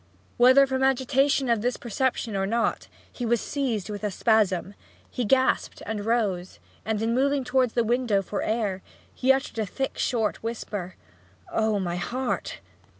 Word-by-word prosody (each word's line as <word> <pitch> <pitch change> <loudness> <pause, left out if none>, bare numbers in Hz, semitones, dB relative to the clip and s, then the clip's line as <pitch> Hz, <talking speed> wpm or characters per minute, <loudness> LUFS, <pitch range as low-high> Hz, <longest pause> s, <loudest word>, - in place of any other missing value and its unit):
Whether 260 +3 +7
from 265 -1 -2
the 265 - +5
agitation 270 +1 +2
of 230 -3 +2
this 245 +2 -1
perception 240 -1 -2
or 195 0 0
not, 230 +3 0 0.3
he 245 - -6
was 235 0 +2
seized 240 -9 -2
with 205 0 -6
a 210 - 0
spasm; 200 -2 +1 0.4
he 250 - -2
gasped, 260 +4 +1
rose, 210 -4 -1 0.3
and 220 -1 -1
in 230 +1 +1
moving 275 +2 +2
towards 250 -1 +1
the 235 - +2
window 230 -4 +1
for 200 - -3
air 210 -4 -1 0.3
he 260 +1 +3
uttered 265 -3 -1
in - - +2 0.2
a - - -7
short 225 -4 0
thick - - -29
whisper, 205 -5 -5 0.6
'Oh, 220 -2 +1
my 175 -2 -2
heart!' 210 - -3
230 Hz, 165 wpm, -26 LUFS, 205-260 Hz, 0.6 s, Whether